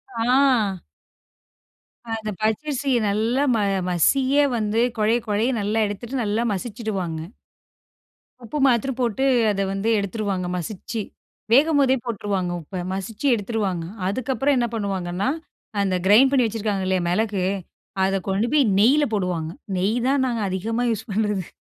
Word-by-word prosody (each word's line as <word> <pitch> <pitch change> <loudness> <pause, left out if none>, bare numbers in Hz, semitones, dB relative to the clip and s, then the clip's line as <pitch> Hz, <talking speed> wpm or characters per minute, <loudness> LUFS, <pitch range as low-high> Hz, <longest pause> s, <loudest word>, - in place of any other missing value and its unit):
ஆ. 235 -4 +2 1.4
அந்த 220 -1 -5
பச்சரிசிய 265 +4 0
நல்லா 225 +7 +1
ம - - +2 0.3
மசியே 265 - +3
வந்து 220 +1 0 0.2
கொழைய 220 +3 +3
கொழைய 215 +4 +1
நல்லா 215 +2 0
எடுத்துட்டு, 235 +6 -4
நல்லா 215 +3 0
மசிச்சிடுவாங்க. 195 -5 -4 1.2
உப்பு 230 +6 -5
மாத்தரம் 250 0 +2
போட்டு 245 +2 0 0.3
அத 195 -1 -1
வந்து 195 +3 -1
எடுத்துடுவாங்க, 200 -2 -2
மசிச்சி 205 +5 -5 0.5
வேகும்போதே 280 -1 +5
போட்டுருவாங்க. 200 -5 -2
உப்ப 180 +4 -6
மசிச்சி 205 +6 -5
எடுத்துருவாங்க. 205 -5 -2 0.2
அதற்கப்புறம் 265 +6 0
என்ன 240 -1 +1
பண்ணுவாங்கன்னா, 195 -1 -2 0.5
அந்த 190 -2 +1
கிரைண்ட் 250 +7 +6
பண்ணி 260 -3 +4
வைச்சிருக்காங்க 210 -3 -2
இல்லயா, 185 -1 +1
மிளகு 200 0 0 0.6
அத 195 - 0
கொண்டு 195 +4 +1
போய் 290 -3 +5
நெய்யில 270 +8 +5
போடுவாங்க. 180 -5 -1 0.3
நெய் 195 +5 +1
தான் 270 0 +2
நாங்க 235 -3 -2
அதிகமா 225 +6 -2
யூசு 225 +1 -3
பண்ணுறது. 205 -3 -1
215 Hz, 125 wpm, -23 LUFS, 195-245 Hz, 1.4 s, கிரைண்ட்